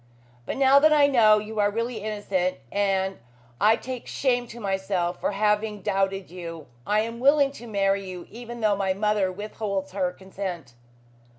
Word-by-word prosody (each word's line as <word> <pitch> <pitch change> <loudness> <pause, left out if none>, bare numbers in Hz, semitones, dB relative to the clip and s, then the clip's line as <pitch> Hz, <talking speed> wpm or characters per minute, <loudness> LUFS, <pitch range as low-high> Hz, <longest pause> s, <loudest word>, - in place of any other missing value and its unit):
"But - - -3
now 270 +1 +6
that 310 +2 +5
I 295 -2 +6
know 225 -6 +5
you 210 +1 -4
are 205 0 +4
really 230 +3 -2
innocent, 200 -4 -2
and 195 -1 0 0.4
I 215 +7 +5
take 255 0 -7
shame 245 -3 0
to 235 +1 -10
myself 190 -3 -1
for - - -1
having 210 0 0
doubted 195 -1 -1
you, 165 -3 -7 0.2
I 210 +1 +3
am 230 +1 -5
willing 280 +1 +4
to 240 -4 -11
marry 195 -2 +1
you, 180 -1 -7
even 240 +1 -8
though 210 -2 +3
my 190 -1 0
mother 210 -2 +1
withholds 200 0 -4
her 185 -2 -1
consent." 185 -7 -7
205 Hz, 170 wpm, -25 LUFS, 190-230 Hz, 0.4 s, now